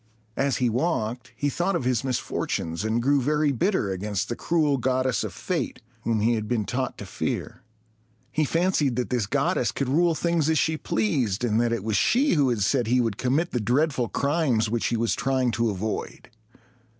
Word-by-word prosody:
As 140 Hz, -1 st, +1 dB
he 125 Hz, -, +1 dB
walked, 120 Hz, -2 st, -1 dB
he 145 Hz, +5 st, -1 dB
thought 175 Hz, +6 st, 0 dB
of 170 Hz, -, -1 dB
his 125 Hz, -1 st, +1 dB
misfortunes, 90 Hz, -9 st, -2 dB
and 110 Hz, +2 st, 0 dB
grew 140 Hz, +1 st, +3 dB
very 150 Hz, +2 st, +2 dB
bitter 140 Hz, -, 0 dB
against 100 Hz, +1 st, -2 dB
the 120 Hz, -, -2 dB
cruel 150 Hz, -1 st, +1 dB
goddess 130 Hz, 0 st, 0 dB
of -, -, -4 dB
fate, -, -, -3 dB, 0.2 s
whom 115 Hz, -2 st, 0 dB
he 115 Hz, +3 st, +3 dB
had 110 Hz, -2 st, -2 dB
been 115 Hz, -3 st, 0 dB
taught 130 Hz, +3 st, -2 dB
to -, -, -7 dB
fear. -, -, -4 dB, 0.7 s
He 155 Hz, -, +1 dB
fancied 160 Hz, -4 st, +1 dB
that 125 Hz, +1 st, -2 dB
this 120 Hz, -5 st, 0 dB
goddess 140 Hz, -, +1 dB
could 130 Hz, +5 st, -2 dB
rule 165 Hz, +4 st, +3 dB
things 170 Hz, -2 st, +1 dB
as 160 Hz, -, +2 dB
she 160 Hz, +2 st, +2 dB
pleased, 110 Hz, -5 st, 0 dB
and 115 Hz, -1 st, +2 dB
that 120 Hz, -1 st, +1 dB
it 115 Hz, -4 st, -1 dB
was 110 Hz, -2 st, 0 dB
she 265 Hz, -, +3 dB
who 145 Hz, -5 st, +3 dB
had 115 Hz, -4 st, -1 dB
said 120 Hz, +1 st, +1 dB
he 125 Hz, +2 st, +3 dB
would 115 Hz, -4 st, 0 dB
commit 145 Hz, +7 st, +1 dB
the 125 Hz, -, 0 dB
dreadful 125 Hz, +1 st, +1 dB
crimes 140 Hz, -, +1 dB
which 120 Hz, -1 st, 0 dB
he 120 Hz, -, 0 dB
was 115 Hz, 0 st, +1 dB
trying 130 Hz, -2 st, +1 dB
to 115 Hz, 0 st, 0 dB
avoid. 105 Hz, +2 st, -4 dB
125 Hz, 200 wpm, -25 LUFS, 115-145 Hz, 0.7 s, grew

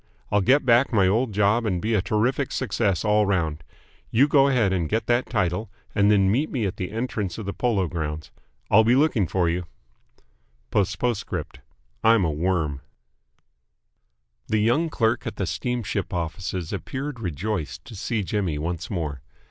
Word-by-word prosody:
I'll 105 Hz, -, +3 dB
get 135 Hz, +8 st, +3 dB
back 125 Hz, +3 st, +4 dB
my 100 Hz, -5 st, +4 dB
old 110 Hz, +5 st, +1 dB
job 105 Hz, +3 st, +2 dB
and 95 Hz, -5 st, 0 dB
be 110 Hz, +6 st, -1 dB
a 105 Hz, -, +3 dB
terrific 120 Hz, +8 st, 0 dB
success 105 Hz, -6 st, 0 dB
all 105 Hz, -1 st, +3 dB
round. 80 Hz, -5 st, -1 dB, 0.5 s
You 135 Hz, +6 st, +4 dB
go 140 Hz, -2 st, +5 dB
ahead 115 Hz, -8 st, +2 dB
and 85 Hz, -4 st, -1 dB
get 110 Hz, +2 st, 0 dB
that 120 Hz, +1 st, +1 dB
title 95 Hz, -1 st, -1 dB, 0.2 s
and 100 Hz, -1 st, +3 dB
then 100 Hz, -2 st, +4 dB
meet 140 Hz, +8 st, +1 dB
me 120 Hz, -6 st, -1 dB
at 95 Hz, -, -3 dB
the 90 Hz, -, -4 dB
entrance 110 Hz, -5 st, -3 dB
of 110 Hz, -, -6 dB
the 100 Hz, -, -3 dB
Polo 105 Hz, -7 st, 0 dB
Grounds. 80 Hz, -2 st, -4 dB, 0.4 s
I'll 110 Hz, +2 st, +7 dB
be 120 Hz, +3 st, +4 dB
looking 135 Hz, -, +2 dB
for 90 Hz, -1 st, +1 dB
you. 85 Hz, +1 st, -1 dB, 1.1 s
P.P.S. 100 Hz, -2 st, +1 dB, 1.1 s
I'm 110 Hz, -4 st, +5 dB
a 80 Hz, -, 0 dB
worm. 75 Hz, -3 st, -1 dB, 1.7 s
The 110 Hz, -, +1 dB
young 150 Hz, +9 st, +2 dB
clerk 115 Hz, -3 st, 0 dB
at -, -, -4 dB
the 95 Hz, -, -2 dB
steamship 115 Hz, -1 st, -2 dB
offices 85 Hz, 0 st, -4 dB
appeared 135 Hz, -1 st, -5 dB
rejoiced 90 Hz, -, -4 dB
to 110 Hz, -, -10 dB
see 105 Hz, +2 st, -2 dB
Jimmy 90 Hz, -4 st, -1 dB
once 85 Hz, +3 st, -4 dB
more. 75 Hz, -, -3 dB
105 Hz, 165 wpm, -24 LUFS, 90-115 Hz, 1.7 s, I'll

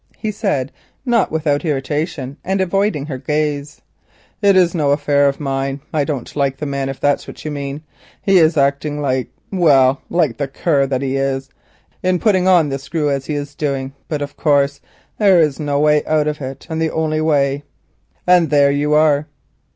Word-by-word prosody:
he 215 Hz, -, -3 dB
said, 170 Hz, -, -2 dB, 0.3 s
not 235 Hz, -5 st, +2 dB
without 150 Hz, -2 st, 0 dB
irritation, 145 Hz, -2 st, -2 dB
and 190 Hz, +1 st, -1 dB
avoiding 190 Hz, -4 st, 0 dB
her 135 Hz, -4 st, -5 dB
gaze. 150 Hz, +1 st, -2 dB, 0.6 s
"It 200 Hz, -2 st, +4 dB
is 180 Hz, -2 st, +4 dB
no 150 Hz, -5 st, +1 dB
affair 145 Hz, 0 st, +3 dB
of 140 Hz, -, -5 dB
mine. 135 Hz, -1 st, -2 dB
I 150 Hz, -2 st, +1 dB
don't 140 Hz, -5 st, -5 dB
like 140 Hz, -2 st, 0 dB
the 150 Hz, -, -4 dB
man, 140 Hz, -1 st, -2 dB
if 135 Hz, -, -6 dB
that's 145 Hz, 0 st, 0 dB
what -, -, -11 dB
you 155 Hz, -, -3 dB
mean. 140 Hz, +1 st, -5 dB, 0.4 s
He 195 Hz, -2 st, +4 dB
is 160 Hz, -1 st, +3 dB
acting 140 Hz, +1 st, +1 dB
like—well, 135 Hz, +1 st, +1 dB
like 155 Hz, -10 st, +1 dB
the 140 Hz, -, -2 dB
cur 140 Hz, 0 st, +1 dB
that 135 Hz, 0 st, -2 dB
he 135 Hz, 0 st, -1 dB
is, 135 Hz, 0 st, -2 dB, 0.5 s
in 185 Hz, 0 st, +1 dB
putting 185 Hz, -1 st, +2 dB
on 175 Hz, -5 st, +4 dB
the 135 Hz, 0 st, -3 dB
screw 150 Hz, +1 st, -2 dB
as 135 Hz, -1 st, -2 dB
he 150 Hz, -, -2 dB
is 145 Hz, 0 st, -5 dB
doing; 135 Hz, -3 st, -3 dB
but, 150 Hz, -2 st, -2 dB
of 145 Hz, 0 st, -8 dB
course, 140 Hz, -2 st, +1 dB, 0.4 s
that 205 Hz, -3 st, +5 dB
is 155 Hz, -6 st, +3 dB
the 145 Hz, -2 st, -1 dB
way 150 Hz, 0 st, +3 dB
out 155 Hz, -1 st, +2 dB
of 150 Hz, 0 st, -3 dB
it, 130 Hz, 0 st, -7 dB
and 160 Hz, -1 st, -3 dB
the 160 Hz, -, +1 dB
only 155 Hz, -1 st, -1 dB
way, 140 Hz, -3 st, +1 dB, 0.6 s
and 180 Hz, -2 st, +4 dB
there 140 Hz, -1 st, +4 dB
you 145 Hz, +1 st, +1 dB
are." 150 Hz, -1 st, +3 dB
145 Hz, 190 wpm, -18 LUFS, 140-160 Hz, 0.6 s, that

